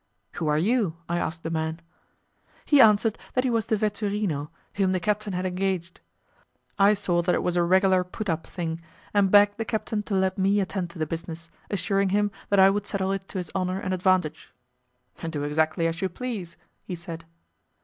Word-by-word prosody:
"Who 165 Hz, -, -3 dB
are 150 Hz, 0 st, +2 dB
you?" 195 Hz, -1 st, +1 dB
I 170 Hz, +1 st, 0 dB
asked 165 Hz, 0 st, -3 dB
the 165 Hz, -, -3 dB
man. 160 Hz, 0 st, -2 dB, 0.9 s
He 290 Hz, -3 st, +6 dB
answered 215 Hz, 0 st, +4 dB, 0.2 s
that 255 Hz, -, +3 dB
he 255 Hz, -, +1 dB
was 225 Hz, -2 st, 0 dB
the 220 Hz, -, +2 dB
'vetturino' 205 Hz, -7 st, -1 dB, 0.2 s
whom 190 Hz, -2 st, +1 dB
the 185 Hz, -, +1 dB
captain 210 Hz, +1 st, -1 dB
had 180 Hz, +1 st, -2 dB
engaged. 185 Hz, -2 st, -2 dB, 0.8 s
I 200 Hz, +2 st, +6 dB
saw 180 Hz, -4 st, +1 dB
that 180 Hz, +1 st, +1 dB
it -, -, -1 dB
was 180 Hz, -, 0 dB
a 175 Hz, -, +3 dB
regular 185 Hz, +1 st, +4 dB
put 205 Hz, +4 st, -6 dB
up 165 Hz, -2 st, -2 dB
thing, 165 Hz, -2 st, -4 dB, 0.3 s
and 200 Hz, -2 st, +4 dB
begged 205 Hz, +1 st, +5 dB
the -, -, +1 dB
captain 220 Hz, -1 st, -2 dB
to 210 Hz, -1 st, -3 dB
let 190 Hz, 0 st, +1 dB
me 195 Hz, +2 st, +3 dB
attend 190 Hz, -2 st, -2 dB
to 170 Hz, -, -12 dB
the 155 Hz, -, 0 dB
business, 165 Hz, +1 st, -6 dB, 0.2 s
assuring 195 Hz, 0 st, +1 dB
him 205 Hz, +1 st, +1 dB, 0.2 s
that 200 Hz, -, +3 dB
I 190 Hz, 0 st, +8 dB
would 205 Hz, 0 st, -2 dB
settle 190 Hz, -1 st, -1 dB
it 195 Hz, 0 st, -3 dB
to -, -, -7 dB
his 180 Hz, -3 st, -4 dB
honour 185 Hz, 0 st, -1 dB
and 185 Hz, -1 st, -2 dB
advantage. 185 Hz, -4 st, +1 dB, 0.8 s
"Do 150 Hz, -3 st, -3 dB
exactly 155 Hz, +3 st, +1 dB
as 165 Hz, 0 st, -1 dB
you 190 Hz, -, 0 dB
please," 195 Hz, -5 st, -5 dB, 0.3 s
he 180 Hz, -, -5 dB
said. 165 Hz, -1 st, -8 dB
185 Hz, 200 wpm, -26 LUFS, 170-205 Hz, 0.9 s, I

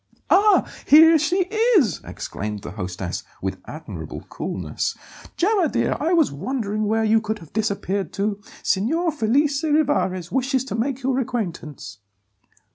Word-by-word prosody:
"Ah! 410 Hz, +2 st, +5 dB, 0.2 s
here 320 Hz, +2 st, +8 dB
she 350 Hz, +6 st, +1 dB, 0.4 s
is!" 225 Hz, -, +2 dB
exclaimed 105 Hz, 0 st, -6 dB
the -, -, -6 dB
hostess, 90 Hz, -2 st, -5 dB, 0.2 s
with 95 Hz, 0 st, -4 dB
admirable 155 Hz, +1 st, -8 dB
coolness. -, -, -3 dB, 0.4 s
"Gemma, 380 Hz, -3 st, +2 dB
dear, -, -, 0 dB
I 320 Hz, +4 st, 0 dB
was 330 Hz, -4 st, +3 dB
wondering 215 Hz, -, -2 dB
where 225 Hz, +1 st, +1 dB
you 220 Hz, 0 st, +3 dB
could 220 Hz, 0 st, -3 dB
have 165 Hz, -6 st, -15 dB
disappeared 200 Hz, -4 st, -1 dB
to. 205 Hz, 0 st, -2 dB, 0.2 s
Signor 320 Hz, -, +1 dB
Felice 280 Hz, +3 st, +1 dB
Rivarez 290 Hz, -, +1 dB
wishes 265 Hz, 0 st, 0 dB
to 265 Hz, -, -4 dB
make 260 Hz, +3 st, -2 dB
your 260 Hz, 0 st, +1 dB
acquaintance." 185 Hz, -, -5 dB
225 Hz, 135 wpm, -22 LUFS, 190-295 Hz, 0.4 s, here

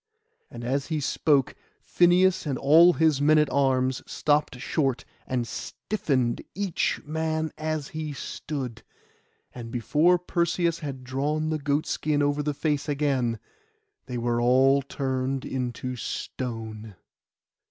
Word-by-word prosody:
And 120 Hz, 0 st, -9 dB
as 135 Hz, +3 st, -1 dB
he 160 Hz, -2 st, -1 dB
spoke 140 Hz, -1 st, +1 dB, 0.3 s
Phineus 180 Hz, 0 st, +3 dB
and 135 Hz, -3 st, -1 dB
all 165 Hz, +7 st, +6 dB
his 155 Hz, -4 st, +2 dB
men 155 Hz, +2 st, +5 dB
at 150 Hz, -1 st, +3 dB
arms 130 Hz, -2 st, +1 dB
stopped 150 Hz, -3 st, +1 dB
short, 135 Hz, 0 st, -1 dB, 0.2 s
and 125 Hz, -2 st, -1 dB
stiffened 130 Hz, -, -2 dB
each 195 Hz, -3 st, -1 dB
man 160 Hz, +1 st, -2 dB
as 155 Hz, -2 st, -3 dB
he 155 Hz, -1 st, -4 dB
stood; 130 Hz, -4 st, -5 dB, 0.7 s
and 120 Hz, -2 st, -8 dB
before 150 Hz, +9 st, +3 dB
Perseus 170 Hz, -1 st, 0 dB
had 135 Hz, -4 st, -6 dB
drawn 150 Hz, +5 st, -1 dB
the 155 Hz, -, -1 dB
goat 145 Hz, +1 st, 0 dB
skin 145 Hz, -1 st, 0 dB
over 145 Hz, +1 st, +1 dB
the 145 Hz, 0 st, -2 dB
face 145 Hz, 0 st, -1 dB
again, 135 Hz, -5 st, 0 dB, 0.7 s
they 125 Hz, -2 st, -4 dB
were 120 Hz, 0 st, 0 dB
all 130 Hz, +3 st, +4 dB
turned 135 Hz, -1 st, -2 dB
into 125 Hz, 0 st, -3 dB
stone. 110 Hz, -4 st, -5 dB
140 Hz, 130 wpm, -26 LUFS, 130-155 Hz, 0.7 s, all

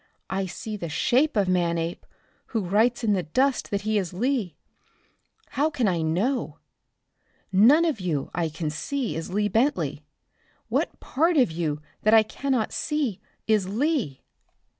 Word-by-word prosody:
I 190 Hz, 0 st, -1 dB
see 210 Hz, +4 st, -6 dB
the 170 Hz, -4 st, -5 dB
shape 260 Hz, -, +2 dB
of 200 Hz, -2 st, +3 dB
Manape, 170 Hz, -2 st, -1 dB, 0.4 s
who 225 Hz, -, -1 dB
writes 225 Hz, +6 st, +2 dB
in 215 Hz, -2 st, +3 dB
the 190 Hz, -, +1 dB
dust 260 Hz, -, 0 dB
that 200 Hz, -1 st, -1 dB
he 215 Hz, 0 st, +1 dB
is 180 Hz, -3 st, -4 dB
Lee. 225 Hz, -, -1 dB, 0.9 s
How 295 Hz, +3 st, +1 dB
can 270 Hz, -7 st, 0 dB
I 175 Hz, -4 st, +1 dB
know? 190 Hz, +12 st, -1 dB, 0.9 s
None 250 Hz, -, +6 dB
of 310 Hz, -10 st, 0 dB
you 165 Hz, -7 st, -2 dB
I 165 Hz, -2 st, 0 dB
can 155 Hz, 0 st, -4 dB
see 260 Hz, -, -3 dB
is 165 Hz, 0 st, -4 dB
Lee 205 Hz, +2 st, +1 dB
Bentley. 240 Hz, +8 st, 0 dB, 0.7 s
What -, -, -1 dB
part 330 Hz, +4 st, +1 dB
of 250 Hz, -, +4 dB
you 155 Hz, -3 st, -2 dB, 0.2 s
that 215 Hz, +1 st, +5 dB
I 220 Hz, -, +7 dB
cannot 255 Hz, +1 st, -2 dB
see 295 Hz, -, -1 dB, 0.3 s
is 210 Hz, -4 st, +2 dB
Lee?" 230 Hz, -, -1 dB
210 Hz, 155 wpm, -25 LUFS, 175-260 Hz, 0.9 s, I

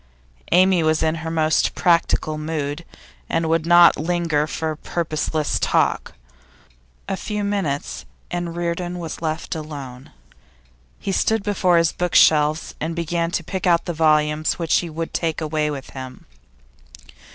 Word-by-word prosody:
Amy 185 Hz, 0 st, +5 dB
was 155 Hz, 0 st, +1 dB
in 160 Hz, 0 st, +2 dB
her 160 Hz, -, -4 dB
most 160 Hz, -1 st, +1 dB
practical 170 Hz, -2 st, +2 dB
mood, 155 Hz, 0 st, -3 dB, 0.5 s
and 165 Hz, 0 st, 0 dB
would 165 Hz, 0 st, +1 dB
not 175 Hz, 0 st, +7 dB
linger 165 Hz, -2 st, 0 dB
for 160 Hz, 0 st, -3 dB
purposeless 155 Hz, -1 st, -2 dB
talk. -, -, +1 dB, 0.9 s
A -, -, -1 dB
few 210 Hz, +1 st, -4 dB
minutes, 195 Hz, -9 st, -2 dB, 0.3 s
and 175 Hz, -1 st, -3 dB
Reardon 175 Hz, +1 st, -3 dB
was 165 Hz, -2 st, -6 dB
left 160 Hz, 0 st, -3 dB
alone. 140 Hz, -5 st, -8 dB, 0.9 s
He 195 Hz, -, -4 dB
stood 220 Hz, +2 st, +1 dB
before 185 Hz, -4 st, +2 dB
his 165 Hz, -1 st, +3 dB
bookshelves 155 Hz, -3 st, +3 dB
and 160 Hz, +1 st, -2 dB
began 170 Hz, 0 st, -1 dB
to 170 Hz, -, -2 dB
pick 185 Hz, +2 st, -3 dB
out 170 Hz, -1 st, +3 dB
the 175 Hz, -, -3 dB
volumes 155 Hz, -1 st, +2 dB
which 165 Hz, -2 st, +2 dB
he 175 Hz, -, -5 dB
would 165 Hz, +1 st, -5 dB
take 165 Hz, -2 st, -1 dB
away 155 Hz, -1 st, -1 dB
with 140 Hz, -2 st, -6 dB
him. 130 Hz, -1 st, -9 dB
165 Hz, 140 wpm, -21 LUFS, 155-175 Hz, 0.9 s, not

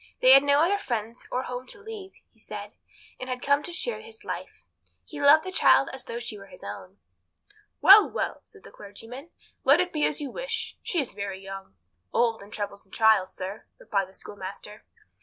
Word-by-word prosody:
They 255 Hz, -, +7 dB
had 270 Hz, +1 st, +10 dB
no 285 Hz, +1 st, +4 dB
other 400 Hz, +4 st, +2 dB
friends 230 Hz, -, -4 dB
or 255 Hz, -, -1 dB
home 250 Hz, 0 st, -6 dB
to 415 Hz, -, -11 dB
leave, 415 Hz, -3 st, -9 dB, 0.2 s
he -, -, -29 dB
said, -, -, -8 dB, 0.5 s
and 255 Hz, -, -6 dB
had 250 Hz, -1 st, -4 dB
come 280 Hz, +1 st, +3 dB
to 350 Hz, -, -4 dB
share 450 Hz, +8 st, -2 dB
his 450 Hz, -1 st, -12 dB
life. -, -, -7 dB, 0.4 s
He 295 Hz, -2 st, -8 dB
loved 295 Hz, +2 st, +7 dB
the 375 Hz, -, -5 dB
child 275 Hz, -, +5 dB
as 265 Hz, -, -7 dB
though 230 Hz, -, -5 dB
she 235 Hz, -3 st, -5 dB
were 195 Hz, -, -12 dB
his 180 Hz, -, -14 dB
own. 100 Hz, -1 st, -8 dB, 0.8 s
"Well, 405 Hz, +2 st, +9 dB
well," -, -, -3 dB
said 415 Hz, -3 st, -18 dB
the -, -, -13 dB
clergyman, 225 Hz, +9 st, -10 dB, 0.3 s
"let 280 Hz, +5 st, +6 dB
it 360 Hz, 0 st, 0 dB
be 300 Hz, -2 st, 0 dB
as -, -, -3 dB
you 285 Hz, -3 st, -5 dB
wish. 485 Hz, -2 st, -4 dB
She 350 Hz, -, -1 dB
is 275 Hz, -, -3 dB
very 200 Hz, -1 st, -5 dB
young." 195 Hz, -, -9 dB, 0.4 s
"Old 230 Hz, -2 st, +1 dB
in 200 Hz, -, -12 dB
troubles 205 Hz, -1 st, -5 dB
and 190 Hz, -, -32 dB
trials, 220 Hz, -4 st, +3 dB
sir," 190 Hz, +3 st, -6 dB
replied 195 Hz, -2 st, -2 dB
the 190 Hz, -, -20 dB
schoolmaster. 205 Hz, +1 st, -9 dB
250 Hz, 205 wpm, -27 LUFS, 200-335 Hz, 0.8 s, had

